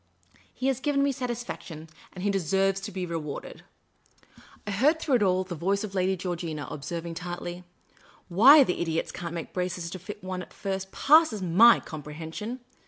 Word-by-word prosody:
He 255 Hz, -, -6 dB
has 265 Hz, -2 st, +1 dB
given 280 Hz, 0 st, +1 dB
me 280 Hz, -, +2 dB
satisfaction, 240 Hz, -, -6 dB, 0.3 s
and 180 Hz, -, -7 dB
he 205 Hz, -, +2 dB
deserves 195 Hz, +1 st, +1 dB
to 200 Hz, -, -6 dB
be 185 Hz, -1 st, -3 dB
rewarded." 160 Hz, -4 st, -6 dB, 1.0 s
I 205 Hz, -, -3 dB
heard 280 Hz, +11 st, +3 dB
through 305 Hz, -3 st, -1 dB
it -, -, -5 dB
all 185 Hz, -2 st, +2 dB
the 185 Hz, -1 st, -7 dB
voice 195 Hz, +5 st, 0 dB
of 205 Hz, -2 st, -6 dB
Lady 190 Hz, 0 st, +1 dB
Georgina 170 Hz, -4 st, -4 dB
observ 165 Hz, +4 st, -5 dB
ing, 170 Hz, -, -5 dB
tartly, 175 Hz, +1 st, -6 dB, 0.3 s
" -, -, -28 dB, 0.3 s
Why 260 Hz, -, +8 dB
the 180 Hz, -, -2 dB
idiots 165 Hz, -1 st, -1 dB
can't 170 Hz, -1 st, -6 dB
make 165 Hz, -, -6 dB
braces 180 Hz, -2 st, -3 dB
to 185 Hz, -, -6 dB
fit 205 Hz, +3 st, -9 dB
one 185 Hz, -1 st, -4 dB
at -, -, -12 dB
first 190 Hz, -1 st, -4 dB
passes 295 Hz, -, +4 dB
my 205 Hz, +8 st, +6 dB
comprehension. 160 Hz, -, -7 dB
185 Hz, 180 wpm, -27 LUFS, 170-215 Hz, 1.0 s, Why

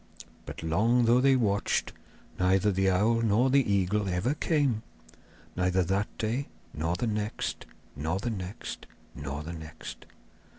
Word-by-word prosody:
But -, -, -7 dB
long 115 Hz, +9 st, +3 dB
though 120 Hz, +2 st, +5 dB
they 135 Hz, 0 st, +5 dB
watched, 105 Hz, -5 st, +1 dB, 0.5 s
neither 95 Hz, +3 st, +3 dB
the 95 Hz, 0 st, +2 dB
owl 110 Hz, +5 st, +3 dB
nor 115 Hz, +4 st, +3 dB
the 140 Hz, +1 st, +6 dB
eagle 100 Hz, +1 st, +1 dB
ever 90 Hz, +10 st, +1 dB
came; 145 Hz, -7 st, +1 dB, 0.7 s
neither 90 Hz, +1 st, +2 dB
that 95 Hz, +4 st, 0 dB
day 120 Hz, +6 st, -1 dB, 0.3 s
nor 80 Hz, +3 st, -1 dB
the 120 Hz, -, -1 dB
next, 105 Hz, -1 st, -3 dB, 0.3 s
nor 80 Hz, +5 st, -1 dB
the 115 Hz, +5 st, -2 dB
next, 95 Hz, -2 st, -6 dB, 0.3 s
nor 70 Hz, +1 st, -5 dB
the 85 Hz, +3 st, -6 dB
next. 80 Hz, -1 st, -9 dB
100 Hz, 140 wpm, -29 LUFS, 90-115 Hz, 0.7 s, the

